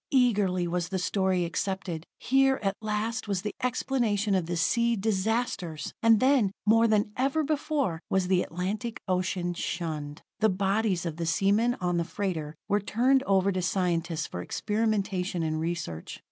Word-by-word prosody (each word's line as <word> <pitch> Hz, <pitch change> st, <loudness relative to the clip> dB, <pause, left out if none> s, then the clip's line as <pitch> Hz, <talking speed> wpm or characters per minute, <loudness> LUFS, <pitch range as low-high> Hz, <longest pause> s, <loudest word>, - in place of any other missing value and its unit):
Eagerly 205 Hz, -9 st, +2 dB
was 175 Hz, 0 st, -2 dB
the 190 Hz, -, -1 dB
story 190 Hz, -1 st, +1 dB
accepted: 180 Hz, -1 st, -3 dB
here, 270 Hz, 0 st, +3 dB
at 195 Hz, -1 st, 0 dB
last, 215 Hz, +1 st, -2 dB
was 195 Hz, -2 st, -1 dB
the 210 Hz, -, -3 dB
explanation 235 Hz, -5 st, 0 dB
of 185 Hz, -4 st, +1 dB
the 175 Hz, 0 st, -2 dB
sea 235 Hz, +7 st, +2 dB
disasters! 200 Hz, -5 st, -1 dB
And 225 Hz, -2 st, +5 dB
then, 255 Hz, -6 st, +3 dB
more 225 Hz, +2 st, +5 dB
than 210 Hz, -1 st, +2 dB
ever 275 Hz, +5 st, +1 dB
before, 290 Hz, -, -1 dB
was 190 Hz, -1 st, +1 dB
the 185 Hz, -1 st, +3 dB
Atlantic 200 Hz, +7 st, -3 dB
ocean 180 Hz, -1 st, 0 dB
shunned. 155 Hz, -4 st, -4 dB, 0.2 s
The 220 Hz, -, +4 dB
bodies 195 Hz, -1 st, 0 dB
of 165 Hz, -2 st, -4 dB
the 170 Hz, -1 st, -2 dB
seamen 205 Hz, +8 st, +2 dB
on 180 Hz, -4 st, -1 dB
the 170 Hz, -, +1 dB
freighter 165 Hz, -4 st, -3 dB
were 205 Hz, +1 st, +2 dB
turned 250 Hz, +6 st, +2 dB
over 195 Hz, 0 st, +3 dB
to 185 Hz, -1 st, -1 dB
scientists 175 Hz, -3 st, 0 dB
for 90 Hz, -, -6 dB
experimentation 200 Hz, -, -1 dB
and 155 Hz, 0 st, -1 dB
research. 160 Hz, -, -4 dB
195 Hz, 160 wpm, -28 LUFS, 175-225 Hz, 0.2 s, And